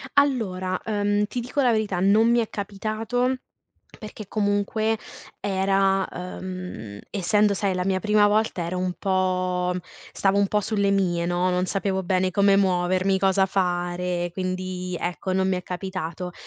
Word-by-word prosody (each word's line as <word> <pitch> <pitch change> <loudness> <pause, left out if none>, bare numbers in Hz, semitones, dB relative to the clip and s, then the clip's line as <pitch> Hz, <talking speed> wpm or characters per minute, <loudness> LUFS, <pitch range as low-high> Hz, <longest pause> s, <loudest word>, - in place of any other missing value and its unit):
Allora, 195 -10 +1
ehm, 205 -1 +1
ti 245 +3 -4
dico 250 +4 -2
la 250 - +4
verità: 210 -5 0
non 215 +5 +4
mi 240 - +4
è 225 - -2
capitato, 220 +5 -2 0.6
perché 215 -1 -9
comunque 215 +2 0 0.4
era 195 0 +2
ehm, 180 - -7
essendo, 205 +1 +2
sai, 195 -1 0
la 180 0 -1
mia 190 -1 +1
prima 210 +1 +4
volta, 210 -3 +1
ero 180 +2 -3
un 180 0 -1
po' 185 -2 0 0.4
stavo 195 0 +2
un 200 - +4
po' 210 - +2
sulle 200 -1 0
mie, 175 -4 +1
no, 175 +1 +1
non 180 0 0
sapevo 190 0 -1
bene 185 +1 +1
come 200 +1 +4
muovermi, 185 0 +2
cosa 190 0 +3
fare, 175 -1 -1
quindi, 185 0 -3
ecco, 180 +2 -3
non 190 0 +2
mi 190 - +1
è 180 - -4
capitato. 180 -1 -5
190 Hz, 155 wpm, -24 LUFS, 180-205 Hz, 0.6 s, la